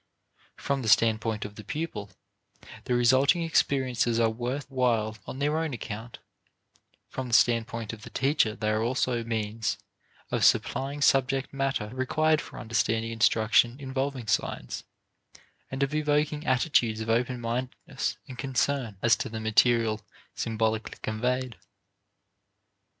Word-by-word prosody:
From 140 -1 -1
the 115 - -1
standpoint 110 0 +3
of 105 - -7
the 105 - -8
pupil, 150 -10 -4 0.8
the 125 - +1
resulting 130 +7 +4
experiences 130 -7 +1
are 115 -1 +3
worth 125 +5 -3
while 120 -5 +1
on - - -6
their 150 +3 +1
own 160 -5 -2
account; 115 +1 -7 0.9
from 130 -1 -5
the 120 - +2
standpoint 115 -1 +2
of 110 - -9
the - - -10
teacher 135 -6 +1
they 110 -1 -1
are 110 0 +1
also 120 0 0
means 110 -2 -2 0.5
of - - 0
supplying 140 +2 +2
subject 135 0 +2
matter 135 -6 -1
required 150 +5 +1
for - - -11
understanding 115 0 0
instruction 115 +1 +3
involving 135 -2 -3
signs, - - -2 0.8
and 135 +1 -1
of 140 +1 -1
evoking 150 0 0
attitudes 125 -4 +2
of 110 - -4
open 120 +2 0
mindedness 120 +2 -3
and 125 -2 -10
concern 130 -4 -1
as 120 -1 +6
to - - -4
the 110 0 -5
material 110 0 +3 0.3
symbolically 110 -1 -1
conveyed. 125 +1 -1
120 Hz, 135 wpm, -27 LUFS, 110-135 Hz, 0.9 s, as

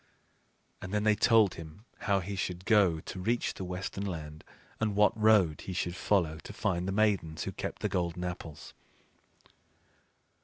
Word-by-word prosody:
And 95 - -7
then 105 0 0
they 110 0 +5
told 110 -2 +4
him 80 +6 -11
how 100 -2 +1
he 100 +3 -5
should 90 0 -4
go 95 -7 +4
to 95 - -7
reach 115 +6 0
the - - -7
Western 90 +2 -4
Land, 80 -5 -6 0.4
and 105 -2 0
what 105 0 +4
road 105 -8 +4
he 95 - -3
should 90 -1 -2
follow 85 -5 +1
to 105 - -10
find 90 -4 -1
the - - -1
Maidens 95 -6 +1
who - - -3
kept - - -6
the - - +3
golden 90 0 -2
apples. 85 -4 -7
95 Hz, 165 wpm, -30 LUFS, 85-105 Hz, 0.4 s, they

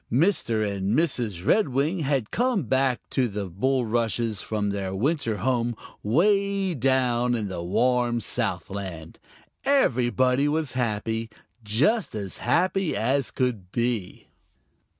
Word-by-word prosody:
Mr. 120 - +2
and 100 +2 -1
Mrs. 120 - 0
Redwing 155 - +2
had 135 -7 -1
come 245 -5 +1
back 130 0 0
to 130 -2 +2
the 100 -2 -4
bulrushes 115 +1 0
from 105 -2 -2
their 95 -1 -3
winter 130 - 0
home 120 +2 0 0.3
way 195 - +2
down 125 -3 +2
in 105 -4 -2
the 90 -2 -4
warm 120 +5 +1
Southland. 95 -7 -4 0.4
Everybody 130 - +2
was 155 -1 -1
happy, 115 -2 -2 0.3
just 140 - +1
as 100 -3 -4
happy 185 0 +1
as 135 0 +1
could 115 -8 -2
be. 115 -5 -2
120 Hz, 115 wpm, -25 LUFS, 105-140 Hz, 0.4 s, Mr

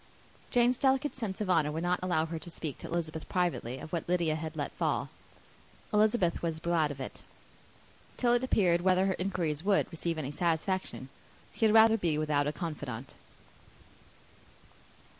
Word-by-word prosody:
Jane's 245 0 +3
delicate 270 +2 +2
sense 215 -6 -4
of 205 - -2
honour 155 -4 +3
would 160 +2 -3
not 175 0 +1
allow 175 -3 +1
her 165 0 -5
to 165 - -9
speak 160 -4 -5
to - - -7
Elizabeth 160 -2 -3
privately 175 -9 -1
of 155 - -10
what 170 0 -3
Lydia 170 -3 +2
had 160 0 -5
let 145 -2 -3
fall; - - -1 0.8
Elizabeth 210 -4 +3
was 165 -2 -2
glad 165 -2 +1
of 145 -2 -7
it: 130 - -7 1.0
till 240 -1 +3
it 245 +1 +2
appeared 180 -9 +3
whether 185 +1 +3
her 190 - +1
inquiries 175 -5 -1
would 200 0 +3
receive 165 0 -2
any 145 -3 -3
satisfaction, 165 -2 -1 0.4
she 225 - +1
had 215 0 +4
rather 225 0 +7
be 170 -7 0
without 150 -2 +1
a - - +1
confidante. 145 - -6
170 Hz, 165 wpm, -30 LUFS, 155-195 Hz, 1.0 s, rather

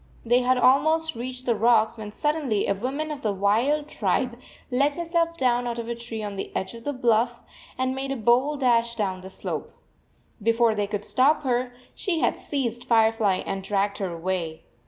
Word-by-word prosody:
They 240 +2 +4
had 255 +1 +2
almost 315 +6 +4
reached 250 +2 -6
the 240 - +3
rocks, 225 0 +3
when 215 -2 -7
suddenly 290 -5 0
a - - +1
\voman 275 +9 -3
of 285 - -9
the 215 - 0
wild 230 +10 +1
tribe 240 +1 -1 0.3
let 280 +3 +2
herself 335 0 -1
down 245 -2 +1
out 235 0 -3
of 230 -1 -5
a 235 - -2
tree 235 -2 -5
on 205 -1 -5
the - - -5
edge 190 - -2
of 230 0 -11
the 290 - 0
bluff 240 -2 +1 0.3
and 260 0 0
9 265 +1 -3
2 - - -5
made 275 - -2
a 220 - -10
bold 265 +6 +3
dash 235 -2 +2
down 190 -4 -2
the 190 - -9
slope. - - -5 0.7
Before 230 +1 +3
they 205 -1 -1
could 205 0 -4
stop 285 +4 +3
her, 250 -1 0 0.2
she 365 -5 -1
had - - +1
seized 245 -4 -3
Fire 225 -2 +4
fly 205 -4 0
and 195 - -3
dragged 200 +1 -1
her 190 -3 -2
away. 170 -1 -3
235 Hz, 205 wpm, -25 LUFS, 210-265 Hz, 0.7 s, They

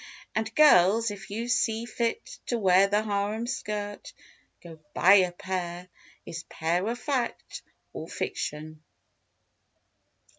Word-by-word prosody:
And 220 +1 -1
girls, 225 -6 +5
if 195 -1 -9
you 225 +4 -4
see 230 -2 0
fit 235 - -3
to 240 - 0
wear 190 -2 +5
The 205 +2 +1
harem 210 +2 -1
skirt, 210 -4 -5 0.5
go 165 -2 -11 0.2
buy 185 +5 +6
a 180 -2 +3
"pair"— 180 0 -5 0.4
Is 165 - -6
"pair" 175 +5 -1
a 235 - -1
fact 255 -1 -3 0.3
or - - -6
fiction? 155 +1 -5
205 Hz, 120 wpm, -27 LUFS, 180-230 Hz, 0.5 s, buy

